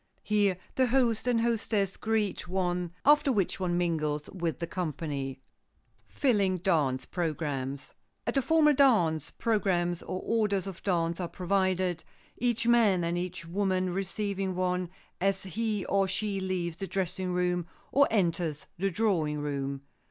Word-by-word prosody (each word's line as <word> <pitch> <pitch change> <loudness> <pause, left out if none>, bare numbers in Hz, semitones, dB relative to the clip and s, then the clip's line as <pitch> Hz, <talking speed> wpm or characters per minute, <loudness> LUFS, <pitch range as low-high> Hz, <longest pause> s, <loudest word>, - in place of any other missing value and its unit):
Here 205 -3 +2 0.2
the 260 -1 +3
host 245 -2 +2
and 235 -2 +3
hostess 220 -4 0
greet 215 -4 -1
one, 180 -1 -1
after 295 -1 +5
which 200 -6 0
one 175 -2 0
mingles 155 -4 -1
with 170 -4 -2
the 170 - -3
company. 145 -6 -4 0.7
[Sidenote: - - -21
FILLING 200 -8 +3
DANCE 155 -8 +1
PROGRAMS] 145 -5 -3 0.3
At - - -1
a 275 - +4
formal 305 +2 +4
dance, 175 - +3
programs 180 -6 0
or 185 - -4
orders 210 -4 +1
of 195 -3 -7
dance 170 -3 0
are 175 - -2
provided, 185 -2 0 0.3
each 235 -1 0
man 220 -7 +4
and 170 +1 0
each 180 -1 -4
woman 185 +1 0
receiving 195 0 -2
one 180 -1 0 0.3
as 195 +1 +1
he 210 0 -2
or 195 -1 +2
she 195 +1 -1
leaves 180 -3 -2
the 195 - -4
dressing 185 -1 -2
room 180 -1 0 0.2
or 280 0 +5
enters 170 -7 0
the 195 +2 +1
drawing 170 -7 0
room. 140 -1 -3
185 Hz, 145 wpm, -29 LUFS, 170-210 Hz, 0.7 s, after